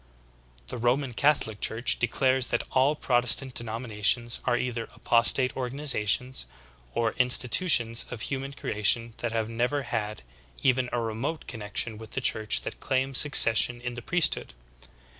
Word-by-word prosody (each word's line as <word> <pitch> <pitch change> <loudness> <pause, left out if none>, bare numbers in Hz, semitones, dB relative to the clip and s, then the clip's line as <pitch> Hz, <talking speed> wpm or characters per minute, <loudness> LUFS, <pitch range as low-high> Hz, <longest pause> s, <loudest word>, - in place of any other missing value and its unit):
The 125 - -6
Roman 125 +2 -1
Catholic 115 -6 0
Church 115 +2 +1
declares 130 +1 0
that - - -2
all 135 +3 +2
Protestant 125 0 +1
denominations 115 0 0
are 120 -1 +1
either 120 -2 -4
apostate 125 +2 +4
organizations, 130 - -1 0.5
or 115 -1 0
institutions 125 -1 +3
of 120 -3 -8
human 135 +2 -5
creation 115 -1 0
that 120 - -4
have 110 -1 -2
never 125 +5 -2
had 110 - -5 0.4
even 130 -2 +1
a 120 - -2
remote 115 +8 -5
connection 110 -1 -3
with 110 -1 -12
the - - -2
church 110 0 +1
that - - -8
claims 130 0 -1
succession 120 -4 +3
in 120 0 -6
the 120 - -8
priesthood. 170 - 0
120 Hz, 140 wpm, -26 LUFS, 115-130 Hz, 0.5 s, apostate